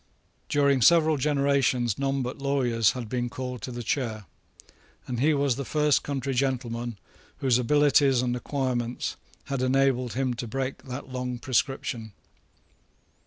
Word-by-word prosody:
During 140 -3 +3
several 160 +3 +5
generations 140 -5 +1
none 135 -1 0
but 125 +2 -5
lawyers 125 -5 +2
had 125 -3 -5
been 120 +1 -2
called 125 -1 -5
to 125 - -5
the 120 0 -5
chair; 110 -4 -2 0.8
and 125 -2 -4
he 150 +5 +4
was 140 -3 +1
the 140 - -3
first 150 +1 +2
country 135 -1 -3
gentleman 120 -3 -2 0.4
whose 125 -3 +2
abilities 140 0 +4
and 125 -1 0
acquirements 125 -2 -2 0.3
had 135 -2 -3
enabled 130 -1 +2
him 130 -1 0
to 120 0 -5
break 135 +3 -4
that 130 +1 -7
long 125 -1 -3
prescription. 120 -3 -2
130 Hz, 140 wpm, -26 LUFS, 120-140 Hz, 0.8 s, several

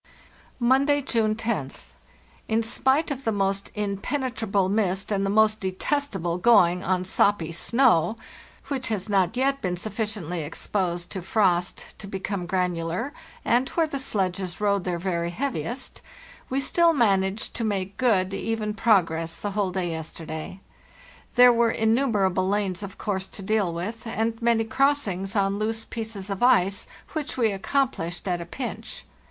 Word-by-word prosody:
"Monday, 275 +4 +3
June 220 -4 +1
roth. 135 - -3 0.5
In 225 +1 +1
spite 265 +7 +2
of 270 -1 -4
the 225 - +1
most 195 -1 -1
impene 210 +7 -2
trable 205 -5 0
mist 195 -1 0
and 195 -1 +1
the 195 - 0
most 215 +1 +3
detestable 185 - -1
going 180 -4 +5
on 185 0 0
soppy 190 -3 +2
snow, 225 0 +3 0.5
which 270 -3 -2
has 215 -2 -2
not 195 +3 +2
yet 275 +1 +1
been 180 -1 -1
sufficiently 205 -4 -3
exposed 175 +3 -2
to 190 - -4
frost 180 -2 0
to 195 - -7
become 195 -1 -4
granular, 180 - -1 0.3
and 245 +3 +2
where 330 - +1
the 285 -3 -4
sledges 190 -6 -1
rode 200 -2 +1
their 180 -1 -1
very 170 -1 -1
heaviest, 240 - -3 0.5
we 265 - 0
still 335 +5 +3
managed 200 -5 +1
to 230 - -3
make 195 -2 -2
good, 195 -7 +2
even 215 +1 -2
progress 165 -7 +1
the 205 - -1
whole 200 -1 0
day 180 -2 -2
yesterday. 160 +2 -6 0.8
There 245 0 +8
were 230 -1 +3
innumer 220 -3 +2
able 185 0 0
lanes, 200 -3 -1
of 200 -2 -7
course, 190 -2 -2
to 200 - -10
deal 205 -3 +1
with, 215 +8 -5
and 225 +1 -1
many 230 -1 +3
crossings 220 -7 0
on 200 0 +1
loose 225 +1 -2
pieces 220 -3 -5
of 195 - -4
ice, 200 -6 +3 0.3
which 310 -4 -3
we 230 -4 +3
accomplished 195 -5 -1
at 175 -2 0
a 170 - -7
pinch. 250 +7 -5
200 Hz, 155 wpm, -25 LUFS, 185-230 Hz, 0.8 s, There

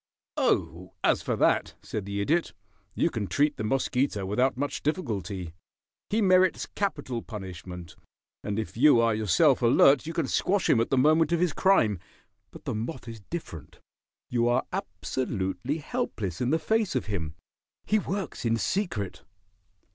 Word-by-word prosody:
"Oh, 90 +2 0
as - - +3
for - - -1
that," - - +2
said 105 -3 -4
the 100 0 -3
Idiot, 165 +11 +1 0.4
"you 170 - +1
can 105 -4 -3
treat 145 - +1
the - - -3
mosquito 125 -2 0
without 125 +7 +1
much 145 +2 -2
difficulty. 105 - -3 0.6
He 215 +1 +1
merits 185 -1 +4
capital 145 - -3
punishment, 90 -5 -8 0.5
and 105 -1 -3
if 110 -5 -4
you 130 0 +6
are 115 -1 +3
yourself 110 - +3
alert 135 +4 +5
you 165 - -4
can 165 -3 0
squash 195 +8 +1
him 115 - +4
at 115 - -1
the 135 - +1
moment 155 +4 +4
of 170 - +2
his 175 -3 +1
crime. 115 - +3 0.5
But - - -14
the - - -2
moth 120 +4 -5
is 115 -1 -7
different. 85 - -7 0.5
You 120 -1 +1
are 125 +2 +1
absolutely 125 - -3
helpless 145 - -3
in 125 - +1
the 160 - +3
face 215 +2 0
of 130 - 0
him. 85 -7 -4 0.5
He 215 - +2
works 195 -5 -4
in 115 -1 +1
secret." 115 - -2
125 Hz, 160 wpm, -27 LUFS, 100-160 Hz, 0.6 s, you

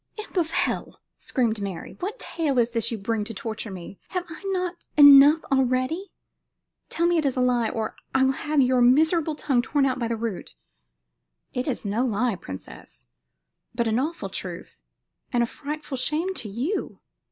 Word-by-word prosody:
"Imp 430 - -8
of 340 -4 +1
hell!" - - -2 0.2
screamed 230 -5 0
Mary; 195 -4 -6
"what 405 +7 -4
tale 310 - -1
is 240 0 +3
this 230 -2 0
you 230 - -3
bring 215 +1 -1
to 225 +1 -7
torture 220 +2 -5
me? 185 0 -9
Have 365 -1 -3
I 320 - -9
not 365 -2 -3
enough 285 +2 +9
already? 265 +8 +1 0.8
Tell 335 - 0
me 345 -1 +3
it 310 - -1
is 265 - -2
a - - +2
lie, 245 -3 +2
or 220 -1 -3 0.2
I 265 - +3
will 265 - +4
have 295 +1 0
your 255 -1 +3
miserable 315 +6 +4
little - - -7
tongue 260 -4 +4
torn 280 +2 +1
out 260 -1 0
by 235 - -1
the 230 - -1
root." 220 - -5 1.0
"It 250 +2 -2
is 255 -5 -3
no 210 +5 0
lie, 240 0 +1
princess, 95 - -10 0.7
but 235 -1 0
an 220 +2 +1
awful 320 +6 -3
truth, - - -7 0.5
and 240 -2 +2
a - - +2
frightful 295 +2 -6
shame 310 +9 0
to 225 - -5
you." 260 - -3
255 Hz, 185 wpm, -25 LUFS, 230-310 Hz, 1.0 s, enough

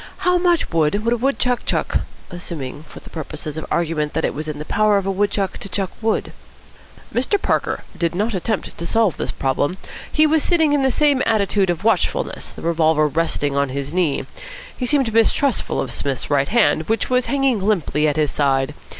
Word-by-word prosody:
How 360 0 +4
much 350 -2 +2
wood 165 +6 +1
would 230 - +3
a - - 0
wood 270 +4 0
chuck 250 -1 0
chuck, - - 0 0.3
assuming 155 -6 -6
for - - -11
purposes 155 -1 -6
of 160 - -5
argument 160 -3 -1
that 160 - 0
it - - -1
was 155 +2 -5
in 150 -1 -4
the 150 - -6
power 215 +2 +3
of 195 - -1
a 195 - 0
wood 200 +2 +1
chuck 200 -1 -2
to 200 - -7
chuck 190 0 -2
wood?" 225 0 -1 0.8
Mr. 260 - +1
Parker - - -1
did 170 0 -1
not 215 +5 0
attempt 200 +3 -2
to 170 - -6
solve 225 -4 +2
this - - -3
problem. 145 +6 -1 0.3
He 310 - +4
was 310 0 +3
sitting 320 -4 +3
in 290 - +3
the 265 - +3
same 285 0 +3
attitude 200 -3 +2
of 175 +2 -1
watchfulness, 220 -6 0
the - - -11
revolver 160 -2 +3
resting 145 -2 -1
on 140 -1 +1
his 140 +2 -4
knee. 175 -6 0 0.5
He 250 - -3
seemed 265 -5 +2
mistrustful 230 +4 +2
of - - -2
Psmith's 140 0 -3
right 140 -1 +2
hand, 210 -8 +2
which 225 +3 0
was 250 0 +2
hanging 270 -5 +1
limply 175 -7 +1
at 150 - +1
his 150 -2 +1
side. 135 -2 +1
190 Hz, 200 wpm, -20 LUFS, 155-235 Hz, 0.8 s, How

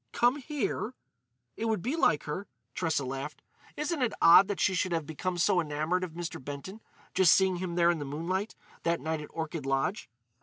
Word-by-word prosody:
"Come 245 +3 +3
here?" 275 -4 -3 0.6
"It 225 - -3
would 220 -5 0
be 260 +7 -1
like 235 - +3
her." 185 +6 -4 0.3
Tressa 160 -5 0
laughed. 135 +2 -5 0.3
"Isn't 300 0 -1
it 245 - +1
odd 170 +3 +8
that 205 - -3
she 190 - +3
should 185 0 0
have 165 -2 -1
become 175 +4 -3
so 175 +1 +3
enamoured 160 +3 -1
of 175 -3 -5
Mr. 170 -5 -6
Benton—just 180 +4 -1
seeing 190 -2 +4
him 175 -1 -4
there 170 0 +5
in 170 - -2
the - - -3
moonlight 175 +9 -3 0.3
that 170 0 +1
night 160 -1 -2
at 150 - -9
Orchid 160 -3 -4
Lodge?" 135 - -1
175 Hz, 190 wpm, -30 LUFS, 155-195 Hz, 0.6 s, odd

